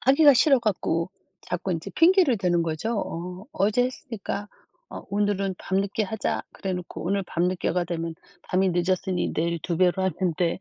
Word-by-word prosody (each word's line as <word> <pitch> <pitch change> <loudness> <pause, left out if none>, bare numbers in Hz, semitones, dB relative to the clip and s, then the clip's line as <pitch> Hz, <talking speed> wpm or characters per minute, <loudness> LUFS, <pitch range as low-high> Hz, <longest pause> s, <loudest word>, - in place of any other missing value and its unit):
하기가 280 +2 +6
싫어 270 +1 +5
갖고 185 -5 0 0.3
자꾸 180 +1 -3
인제 165 -1 -4
핑계를 335 - +5
대는 175 -3 +2
거죠. 170 +8 -2
어. 180 +4 -6
'어제 215 +5 +2
했으니까 225 -5 -5 0.4
어. - - -7
오늘은 200 -1 0
밤늦게 200 +3 0
하자.' 215 +1 -2
그래 190 -1 -4
놓고 180 -2 -6
오늘 195 +2 +1
밤늦게가 175 0 0
되면 165 -1 -3 0.3
'밤이 185 0 +1
늦었으니 180 +1 0
내일 170 +1 0
2 170 -3 -2
배로 185 +1 +3
하면 185 -2 0
돼.' 175 -1 0
190 Hz, 335 characters per minute, -25 LUFS, 175-210 Hz, 0.4 s, 하기가